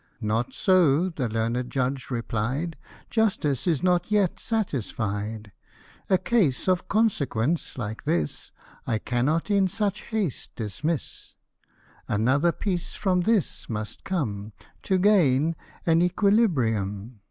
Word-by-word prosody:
" - - -44
Not 110 +1 -1
so," 180 -3 +3
the 135 -9 -3
learned 115 +3 -1
judge 130 0 -2
replied; 125 +6 -2 0.2
" - - -23
Justice 195 - +1
is 165 -2 +1
not 180 0 +2
yet 205 -4 +2
satisfied; 110 - -2 0.6
A 190 - +5
case 185 - +1
of 185 0 +1
consequence, 165 - 0
like 110 -2 -4
this, 75 -4 -1 0.4
I 110 - +1
cannot 140 - 0
in 200 -2 +4
such 205 +1 -1
haste 210 - -3
dismiss; 135 - -4 0.7
Another 130 +11 +2
piece 180 -1 -3
from 185 -3 +1
this 215 0 0
must 105 -1 -5
come 110 - -3 0.3
To 190 - +1
gain 165 -6 +4 0.3
an 165 0 +4
equilibrium." 125 - +1
150 Hz, 120 wpm, -26 LUFS, 115-185 Hz, 0.7 s, A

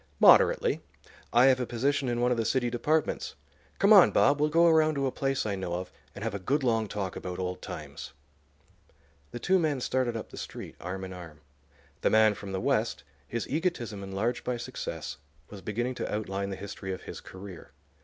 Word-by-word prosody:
"Moderately. - - +6 0.5
I 120 +2 +6
have 130 -1 +5
a 125 - -2
position 135 +2 0
in 120 0 -1
one 125 0 +3
of 125 - +1
the 115 - +1
city 120 +1 0
departments. 150 +6 0 0.4
Come 200 +2 +6
on, 195 -4 +9
Bob; 140 +1 +3
we'll 150 - +3
go 165 +3 +4
around 155 -2 +4
to 140 -1 0
a 130 - 0
place 135 -2 -1
I 105 - -1
know 95 -3 -3
of, 90 +1 -5 0.2
and 105 - -7
have 115 -2 -2
a 100 - -3
good 135 +10 0
long 115 -3 +1
talk 100 -3 -4
about 90 -1 -5
old 90 -1 -3
times." - - -8 1.2
The 120 - -6
two 190 +9 +2
men 155 -5 0
started 125 -2 0
up 110 - -8
the - - -10
street, - - -7
arm 95 +1 -5
in 95 0 -6
arm. 80 -4 -11 0.6
The - - +3
man 110 -1 +5
from 100 -1 -8
the 95 - -2
West, 70 - 0 0.2
his 115 -1 -3
egotism 140 - -2
enlarged 100 +5 -2
by 125 -1 -2
success, 120 - -5 0.3
was 100 -2 -9
beginning 120 +6 -2
to - - -2
outline 100 -2 -2
the 95 - -4
history 95 0 -6
of 95 - -6
his - - -8
career. 95 -2 -10
115 Hz, 205 wpm, -29 LUFS, 95-135 Hz, 1.2 s, on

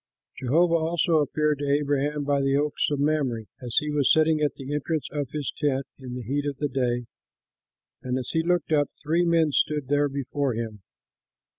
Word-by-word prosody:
Jehovah 165 +7 +3
also 165 0 +1
appeared 150 0 +1
to 145 -1 -2
Abraham 145 0 +1
by 140 0 +1
the 135 0 +2
oaks 145 +1 +1
of 145 -2 -1
Mamre, 140 -6 0 0.2
as 120 -2 -4
he 150 -1 +2
was 145 -3 +3
sitting 155 -1 +4
at 150 - +1
the 135 +1 -6
entrance 150 +1 -1
of 145 -3 -3
his 150 0 -3
tent 135 -2 0
in 125 -2 -7
the 125 - -5
heat 140 +5 -1
of 140 -2 -3
the 145 0 -1
day; 125 -2 -1 1.0
and, 130 0 -2
as 130 - -4
he 160 - +2
looked 175 -1 0
up, 145 -2 +3
three 165 +3 0
men 165 -2 +3
stood 145 -1 0
there 145 0 +2
before 140 -1 -2
him. 110 -3 -5
145 Hz, 190 wpm, -26 LUFS, 135-150 Hz, 1.0 s, sitting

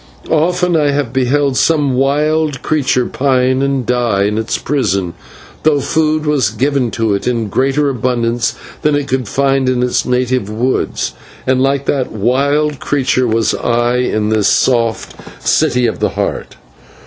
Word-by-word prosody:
Often 175 +2 +1
I 150 -2 +2
have 140 -4 -1
beheld 135 +1 +1
some 150 -5 +2
wild 150 +2 0
creature 135 -5 +1
pine 130 -1 +1
and 135 -2 0
die 120 -5 +1
in 105 +2 0
its 110 - -2
prison, 100 -11 -1 0.5
though 150 -2 +2
food 155 +2 0
was 150 -4 +1
given 135 -2 0
to 110 -2 -1
it 100 - -2
in 115 -4 -1
greater 135 +5 +1
abundance 120 -2 -1 0.3
than 150 -1 +2
it 145 -1 -1
could 130 -3 -2
find 135 +2 +1
in 125 -1 0
its 125 - +1
native 125 -3 0
woods, 115 - -1 0.3
and 130 0 +2
like 140 +1 +1
that 135 -3 -1
wild 140 +7 0
creature 130 -2 0
was 110 -1 +1
I 120 +1 0
in 110 -4 0
this 110 -2 +2
soft 115 -3 +1 0.3
City 125 0 +2
of - - -2
the - - +1
Heart. - - -4
130 Hz, 155 wpm, -15 LUFS, 120-145 Hz, 0.5 s, I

